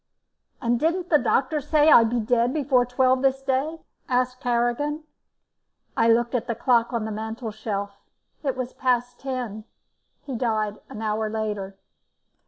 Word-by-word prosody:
"And 240 -1 +1
didn't 340 +4 0
the 300 - +6
doctor 290 +3 +1
say 305 +2 +4
I'd 230 -1 +7
be 240 +1 0
dead 240 +3 +1
before 260 -4 +2
twelve 255 +1 +2
this 270 0 +1
day?" 275 +5 -1 0.3
asked 255 0 0
Harrigan. 245 +6 0 0.9
I 230 - +3
looked 235 +1 +3
at 245 -1 -1
the 235 - -1
clock 235 0 +2
on 230 -3 -2
the 220 - -4
mantelshelf. 215 -2 -5 0.4
It 270 -4 -2
was 255 -1 -4
past 245 -1 0
ten. 245 -6 -4 0.6
He 270 - -5
died 215 -3 -1
an 215 - -7
hour 215 0 -1
later. 210 -3 -4
245 Hz, 150 wpm, -24 LUFS, 220-265 Hz, 0.9 s, I'd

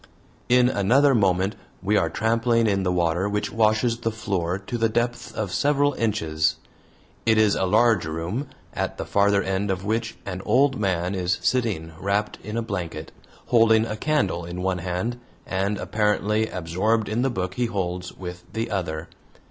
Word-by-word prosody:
In 125 0 +5
another 130 +6 +4
moment 95 -2 +2 0.3
we 105 +3 +2
are 85 -5 +2
trampling 115 +4 +1
in 100 -2 +2
the 90 -1 0
water 90 +2 +1
which 105 0 -2
washes 115 +1 +2
the 115 - -1
floor 95 -5 -2
to 95 +5 -5
the 115 0 +3
depth 120 +1 -1
of 100 -4 -3
several 145 +6 +2
inches. 80 -10 0 0.7
It 110 -1 +3
is 110 -2 +4
a - - +1
large 115 0 +4
room, 85 - -3 0.3
at - - -3
the - - -4
farther 100 0 +3
end 95 +1 -1
of 95 0 -2
which 115 +2 -1
an 95 -1 -5
old 130 +4 +3
man 90 -2 0
is 90 -1 0
sitting 105 -11 0
wrapped 100 +2 -1
in 105 +2 -4
a 115 - 0
blanket, 85 -7 -5 0.4
holding 115 -2 +5
a 110 - -4
candle 110 - 0
in 90 +2 -5
one 95 -1 0
hand, 95 +7 -3 0.3
and 100 +2 -1
apparently 105 +1 +1
absorbed 95 +6 0
in 110 +3 0
the 135 - +2
book 95 -6 -3
he 120 +3 0
holds 90 -4 -3
with 90 -1 -8
the 115 0 -2
other. 85 -4 -3
105 Hz, 170 wpm, -24 LUFS, 90-115 Hz, 0.7 s, In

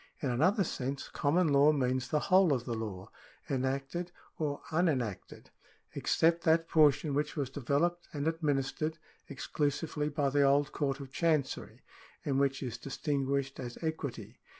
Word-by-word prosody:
— - - -39
In 135 - +1
another 185 - +3
sense 135 -4 -4
common 160 +4 +2
law 140 +1 +6
means 130 -3 0
the 150 - 0
whole 185 -4 +4
of 125 -2 -2
the 120 - -3
law 105 -3 -5 0.4
(enacted 135 +5 -2 0.3
or 145 -3 -2
unenacted) 130 - -1 0.4
except 165 +1 +2
that 165 0 +3
portion 150 -2 +4
which 150 +1 -1
was 140 -4 -2
developed 145 +6 0
and 145 0 -2
administered 155 0 -1 0.3
ex 140 - -7
clusively 150 0 -1
by 145 -2 0
the 145 +1 +3
old 140 +1 +3
Court 140 -2 -1
of 135 -2 -9
Chancery, 155 -3 -1 0.4
and 135 -2 +1
which 140 0 +1
is 125 -2 -5
distin 140 +1 -2
guished 140 0 -1
as 120 -2 -6
equity. 160 -5 -4
145 Hz, 155 wpm, -31 LUFS, 135-160 Hz, 0.4 s, law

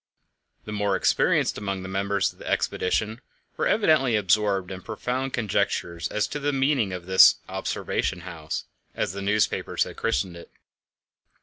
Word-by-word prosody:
The 105 - -6
more 105 -2 0
experienced - - +2
among 100 -2 -3
the - - -6
members 100 +1 0
of - - -27
the - - -9
expedition 110 +5 0 0.3
were - - 0
evidently 155 - +3
absorbed 100 -1 +1
in 95 -1 -6
profound 125 +5 -3
conjectures 100 -7 -1
as 105 0 -1
to 150 - -4
the 145 0 0
meaning 135 -6 +1
of 90 -1 -6
this 95 0 +7
"observation 90 - -2
house," 85 -3 -5 0.3
as - - -1
the 100 - -5
newspapers 105 +2 +1
had - - -9
christened 85 +8 -1
it. 85 - -12
100 Hz, 150 wpm, -25 LUFS, 95-115 Hz, 0.3 s, this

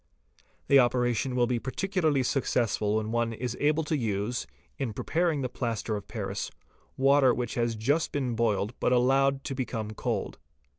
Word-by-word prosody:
The 140 - +7
operation 125 0 +1
will 120 -1 +3
be 120 0 0
particularly 155 - 0
successful 115 -5 0
when 110 0 -1
one 115 0 0
is 120 +1 -4
able 150 +2 +2
to 155 - -1
use, 115 -1 -2 0.3
in 130 -6 -2
preparing 160 +3 0
the - - 0
plaster 115 -3 -3
of 100 -1 -6
paris, - - -4 0.5
water 135 -2 +5
which 125 -1 -3
has 120 -1 0
just 140 +9 0
been 130 -4 -1
boiled 110 -1 0
but - - +1
allowed 135 +2 +3
to - - -4
become 115 -5 -3
cold. 110 - -3
125 Hz, 160 wpm, -28 LUFS, 115-135 Hz, 0.5 s, The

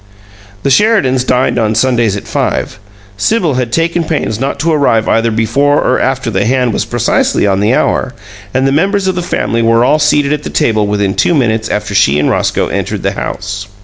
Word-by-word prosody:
The 140 - +1
Sheridans 135 - +2
dined 125 -1 +1
on 110 -1 0
Sundays 115 -3 +1
at - - -9
five. - - -2 0.4
Sibyl 175 - +1
had 125 -2 -2
taken 165 +4 0
pains 150 -9 -2
not 135 +1 -3
to 165 +2 +1
arrive 140 -8 +1
either 115 +1 +2
before 140 +6 +1
or 130 - +1
after 130 -3 -1
the 95 - 0
hand 125 -1 0
was - - -1
precisely - - 0
on 95 -1 +1
the 105 +5 +2
hour; 125 - -1 0.4
and 130 +1 0
the - - +1
members 195 +7 +1
of 190 - +1
the 180 - -3
family 115 -9 -1
were 115 +1 +3
all 150 +4 +2
seated 150 -1 +2
at 150 - -3
the - - -6
table 110 -2 0
within 100 -1 0
two 170 - +1
minutes 115 -5 0
after 105 0 -3
she 70 -7 +3
and 75 - +1
Roscoe - - 0
had - - -2
entered - - -4
the - - 0
house. 100 +1 -5
125 Hz, 210 wpm, -12 LUFS, 110-145 Hz, 0.4 s, were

